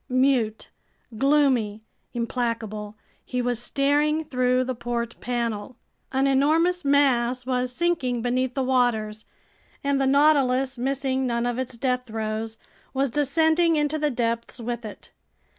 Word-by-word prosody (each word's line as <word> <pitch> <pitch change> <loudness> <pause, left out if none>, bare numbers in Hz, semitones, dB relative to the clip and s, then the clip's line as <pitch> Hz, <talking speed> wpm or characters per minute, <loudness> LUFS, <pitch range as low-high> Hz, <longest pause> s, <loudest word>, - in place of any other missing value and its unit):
Mute, 255 -4 +1 0.5
gloomy, 255 -5 +2 0.3
implacable, 230 -3 -3 0.3
he 250 - -3
was 245 -2 0
staring 295 +4 +1
through 255 -1 +1
the 255 0 -2
port 235 -1 -3
panel. 235 -2 -3 0.4
An 265 +1 +1
enormous 320 +6 +2
mass 255 -3 +2
was 250 -1 -1
sinking 255 -6 0
beneath 250 +1 0
the 270 - 0
waters, 230 -4 0 0.6
and 280 -1 +1
the 270 - +2
Nautilus, 270 -2 +3
missing 265 0 0
none 235 0 0
of 245 0 -1
its 255 -2 -4
death 250 0 -1
throes, 220 0 -4 0.4
was 270 -1 +1
descending 320 +4 +3
into 300 +1 0
the 300 0 +1
depths 235 -1 -2
with 235 0 -4
it. 210 - -10
255 Hz, 130 wpm, -25 LUFS, 235-275 Hz, 0.6 s, Nautilus